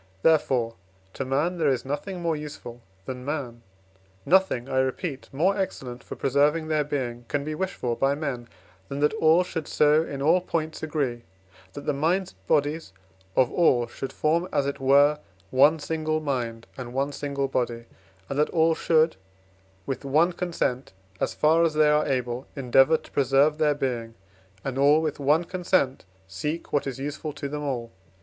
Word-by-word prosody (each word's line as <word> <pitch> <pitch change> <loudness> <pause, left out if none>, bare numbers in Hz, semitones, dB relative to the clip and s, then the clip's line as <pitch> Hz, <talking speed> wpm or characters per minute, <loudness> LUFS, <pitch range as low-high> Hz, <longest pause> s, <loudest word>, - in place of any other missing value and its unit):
Therefore, 130 -7 +3 0.4
to - - -3
man 150 +7 0
there 155 -3 +3
is 130 -2 0
nothing 170 +6 -4
more 165 -1 +1
useful 145 -5 -8 0.2
than 125 +1 -6
man 130 -5 -4 0.6
nothing, 175 -8 +3
I 130 -1 0
repeat, 130 +2 -2
more 175 +9 +2
excellent 135 -10 -4
for - - -8
preserving 150 +4 +1
their 155 -1 +2
being 125 -5 -4
can 145 -1 -1
be 155 +1 -4
wished 190 +4 -3
for 120 -1 -2
by 135 +3 +1
men, 135 -6 -4 0.4
than 140 - -4
that 150 - +3
all 170 -4 +4
should 165 -4 -5
so 150 +1 +4
in 140 -4 -5
all 165 +6 +3
points 160 -3 -3
agree, 145 -6 -2 0.5
that 145 - -8
the 150 - +1
minds 170 +7 0
and 95 0 -31
bodies 145 -6 0 0.4
of 130 -2 +3
all 130 -9 +3
should 135 - -7
form, 165 +3 +1
as 140 - +1
it 140 0 -3
were, 140 +3 +4 0.3
one 145 +5 +5
single 155 0 -2
mind 120 -6 -3
and 125 -1 -7
one 140 +2 0
single 140 -1 -2
body, 120 -3 -2 0.4
and 140 - -3
that 150 - +3
all 165 -1 +3
should, 160 0 +2 0.7
with 135 0 -4
one 155 +6 +3
consent, 165 - -2 0.3
as - - -1
far 160 +2 +4
as 160 -2 +1
they 155 -1 +5
are 150 0 +2
able, 125 -2 -2
endeavour 135 +3 +4
to - - -17
preserve 140 +3 +3
their 150 -2 +3
being, 120 -5 -3 0.5
and 135 0 -2
all 145 +2 +5
with 155 -2 -2
one 150 +4 +3
consent 175 - 0 0.2
seek 150 - -4
what 145 - +1
is 135 - -4
useful 145 +3 -4
to 145 -1 -5
them 150 +1 -5
all. 125 -5 -3
145 Hz, 175 wpm, -26 LUFS, 130-155 Hz, 0.7 s, one